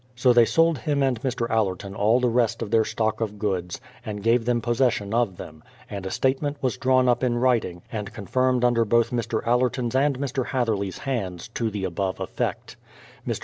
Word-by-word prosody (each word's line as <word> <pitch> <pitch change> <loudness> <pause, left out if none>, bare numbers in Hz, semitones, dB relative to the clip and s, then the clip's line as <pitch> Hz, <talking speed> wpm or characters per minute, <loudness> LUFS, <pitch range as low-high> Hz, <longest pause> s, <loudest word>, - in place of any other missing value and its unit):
So 125 0 +4
tliey 120 -1 +6
sold 165 -3 +3
him 145 +2 0
and 125 -4 0
Mr. 125 -3 -1
Allerton 100 -3 -1
all 110 +5 +3
the 125 - +2
rest 115 -1 +1
of 105 - -7
their 110 -1 +4
stock 110 +1 -1
of 105 -2 -3
goods, 95 -4 -2 0.2
and 105 -2 -6
gave 115 +1 +3
them 120 -1 +1
posses 120 +2 +2
sion 100 +1 -5
of 115 -6 +1
them; 80 0 -10 0.3
and 100 -2 -5
a - - -3
statement 140 +6 0
was 130 -4 -1
drawn 130 0 +2
up 125 +1 +2
in 120 -2 +1
writing, 120 -9 +1
and 105 -2 -4
confirmed 125 +3 0
under 120 -1 +3
both 115 +1 +2
Mr. 115 -2 -2
Allerton's 125 0 +1
and 135 0 +2
Mr. 135 -2 -2
Hatherley's 110 -7 -1
hands, 100 -10 -4
to 115 0 -2
the 105 -2 -5
above 95 +1 -2
effect. - - -4 0.5
J\Ir. - - 0
115 Hz, 200 wpm, -24 LUFS, 105-125 Hz, 0.5 s, tliey